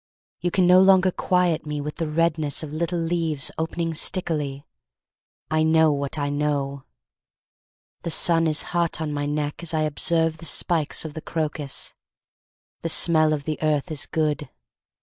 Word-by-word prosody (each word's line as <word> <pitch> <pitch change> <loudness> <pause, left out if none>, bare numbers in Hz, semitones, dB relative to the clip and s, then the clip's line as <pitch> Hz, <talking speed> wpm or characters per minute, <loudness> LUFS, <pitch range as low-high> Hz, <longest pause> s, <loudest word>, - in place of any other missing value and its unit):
You 175 - -1
can 185 +1 +2
no 180 +1 +7
longer 190 -1 +5
quiet 175 -4 0
me 150 0 -3
with 150 +1 -6
the 165 - -2
redness 155 -2 0
Of 150 -1 -7
little 170 +2 -2
leaves 165 -3 -1
opening 165 +1 -2
stickily. 150 -5 0 0.9
I 155 0 +2
know 160 0 +4
what 140 0 -3
I 145 -1 -1
know. 140 -2 -2 1.2
The - - -4
sun 165 0 +3
is 155 -2 +2
hot 170 -2 0
on 155 -2 -3
my 145 0 -2
neck 150 +1 -3
as 170 -1 -3
I 155 - +1
observe 160 +2 0
The 165 - -9
spikes 160 0 +1
of 155 - -6
the 160 - -7
crocus. 150 -4 -4 0.9
The 165 - -3
smell 155 -1 +4
of 150 -2 -1
the 155 -1 -4
earth 155 +1 0
is 150 - -2
good. 150 -2 -1
155 Hz, 165 wpm, -23 LUFS, 150-165 Hz, 1.2 s, no